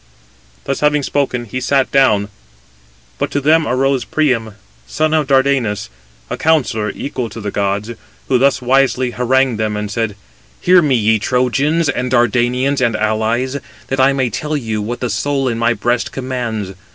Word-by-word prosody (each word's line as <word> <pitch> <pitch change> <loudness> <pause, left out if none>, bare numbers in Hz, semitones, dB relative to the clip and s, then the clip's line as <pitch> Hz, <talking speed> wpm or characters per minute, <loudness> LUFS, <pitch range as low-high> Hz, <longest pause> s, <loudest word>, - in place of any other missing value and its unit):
Thus 135 - -2
having 150 -1 +2
spoken, 130 -4 -1
he 130 +3 -5
sat 135 -1 +1
down; 105 -7 +3 0.9
but - - -1
to 145 - -1
them 155 +3 +3
arose 130 +1 +1
Priam, 120 -9 0 0.3
son 155 - 0
of 155 -3 +1
Dardanus, 130 -6 +1 0.4
a - - -4
counsellor 130 -9 +1
equal 125 -4 -4
to 110 +2 -9
the 105 -2 -4
gods; 100 +3 -1 0.4
who 130 -2 +2
thus 135 -1 +2
wisely 130 -1 +2
harangued 125 -1 +1
them, 105 -1 -1
and 105 0 -4
said: 110 -2 -2 0.4
"Hear 180 0 +5
me, 145 -5 +2
ye 110 -1 +2
Trojans, 135 +8 +1
and 125 -3 -1
Dardanians, 125 +3 +1
and 115 -3 +1
allies, 110 +5 0 0.3
that 135 - -1
I 130 +1 +5
may 130 -3 0
tell 150 +7 -2
you 110 -5 -3
what 120 +4 -4
the 125 - -1
soul 135 +4 -1
in 115 -2 -1
my 120 0 +2
breast 120 +3 -1
commands. 120 -7 -4
125 Hz, 165 wpm, -17 LUFS, 110-135 Hz, 0.9 s, Hear